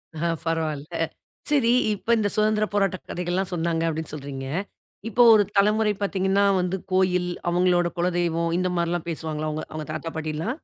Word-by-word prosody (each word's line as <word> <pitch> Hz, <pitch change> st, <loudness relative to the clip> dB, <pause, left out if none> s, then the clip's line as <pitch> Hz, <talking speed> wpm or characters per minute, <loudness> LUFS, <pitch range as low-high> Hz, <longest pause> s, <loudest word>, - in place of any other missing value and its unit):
ஆ, 170 Hz, +2 st, -1 dB, 0.2 s
பரவாயில்ல. 155 Hz, -3 st, -2 dB, 0.6 s
சரி! 270 Hz, -6 st, +3 dB, 0.2 s
இப்ப 225 Hz, +3 st, 0 dB
இந்த 205 Hz, -2 st, +1 dB
சுதந்திர 215 Hz, 0 st, +2 dB
போராட்ட 195 Hz, -2 st, +1 dB
கதைகள்லாம் 180 Hz, +2 st, -2 dB
சொன்னாங்க, 165 Hz, -1 st, 0 dB
அப்படின்னு 160 Hz, -1 st, -3 dB
சொல்றீங்க. 135 Hz, -2 st, -6 dB, 0.6 s
இப்போ 245 Hz, +1 st, +4 dB
ஒரு 210 Hz, -1 st, +6 dB
தலைமுறை 210 Hz, +1 st, +3 dB
பார்த்தீங்கனா, 195 Hz, 0 st, +1 dB, 0.2 s
வந்து 180 Hz, +1 st, -1 dB, 0.2 s
கோயில், 180 Hz, -1 st, +2 dB, 0.2 s
அவங்களோட 175 Hz, 0 st, +3 dB
குலதெய்வம் 170 Hz, -1 st, 0 dB
இந்த 185 Hz, -, 0 dB
மாரில்லாம் 170 Hz, 0 st, -1 dB
பேசுவாங்களா? 155 Hz, -1 st, -3 dB
உங்க 155 Hz, -, -4 dB
அவங்க 155 Hz, -1 st, -5 dB
தாத்தா, 165 Hz, +1 st, -5 dB
பாட்டில்லாம்? 160 Hz, -, -3 dB
175 Hz, 145 wpm, -24 LUFS, 160-195 Hz, 0.6 s, ஒரு